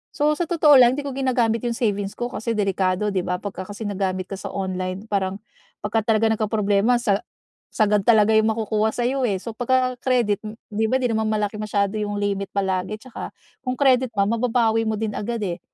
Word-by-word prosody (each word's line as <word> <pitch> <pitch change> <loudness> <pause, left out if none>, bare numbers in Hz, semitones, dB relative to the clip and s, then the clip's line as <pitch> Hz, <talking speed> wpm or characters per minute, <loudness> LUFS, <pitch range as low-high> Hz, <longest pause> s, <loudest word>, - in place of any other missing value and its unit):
So 300 0 +2
sa 345 - -1
totoo 310 -4 +5
lang, 245 +1 +5
hindi 290 - -4
ko 280 - -4
ginagamit 245 -4 +1
'yong 235 -1 -2
savings 205 -4 -1
ko 240 - -2
kasi 230 0 -3
delikado, 195 0 0
'di 185 - +1
ba? 180 0 -1
Pagka 190 -2 -6
kasi 205 +2 -6
nagamit 190 -2 -2
ka 195 - -4
sa - - -6
online 185 0 -3
parang 195 -2 -1 0.5
pagka 215 +1 -1
talaga 220 +1 +2
nagkaproblema 215 +1 +2
sa 205 -4 +1 0.5
sagad 210 -2 +2
talaga 220 -2 +5
'yong 220 0 +4
makukuha 220 0 0
sa 240 - -1
'yo, 265 +1 -1
eh. 195 -3 -1
So 230 - -6
pagka 255 +1 +1
credit, 240 -6 +2 0.3
'di 215 +1 0
ba 260 - +3
'di 255 - +1
naman 220 0 0
malaki 210 -1 -1
masyado 205 -1 -1
'yong 205 -1 -2
limit 200 -1 -2
palagi, 190 +1 -1
at - - -18
saka - - -7 0.4
kung 255 0 -1
credit 260 -3 +3
man 200 0 +2
mababawi 230 -1 +2
mo 220 - 0
din 215 -2 -2
agad, 230 +2 -3
eh. 180 -3 -3
215 Hz, 205 wpm, -23 LUFS, 200-240 Hz, 0.5 s, totoo